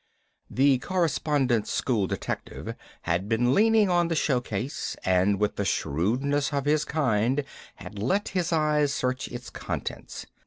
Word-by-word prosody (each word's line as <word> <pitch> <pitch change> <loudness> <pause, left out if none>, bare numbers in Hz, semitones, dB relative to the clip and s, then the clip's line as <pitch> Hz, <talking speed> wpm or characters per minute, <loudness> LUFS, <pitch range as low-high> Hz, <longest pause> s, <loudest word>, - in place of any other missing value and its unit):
The 135 0 +3
Correspondence 145 - 0
School 110 -7 0
detective - - -5 0.3
had 90 +5 -1
been 120 +2 +2
leaning 220 +1 +4
on 175 -1 +3
the 165 - -1
show 135 -5 +1
case, 120 +5 -4
and 95 +2 +3
with 105 0 0
the 100 - 0
shrewdness 125 - 0
of 140 -2 -1
his 150 +1 +2
kind 130 -2 +1 0.3
had 100 0 -9
let 190 - 0
his 180 -3 -1
eyes 150 -3 +2
search 130 -1 -1
its 120 -1 -8
contents. - - -5
130 Hz, 145 wpm, -26 LUFS, 105-150 Hz, 0.3 s, leaning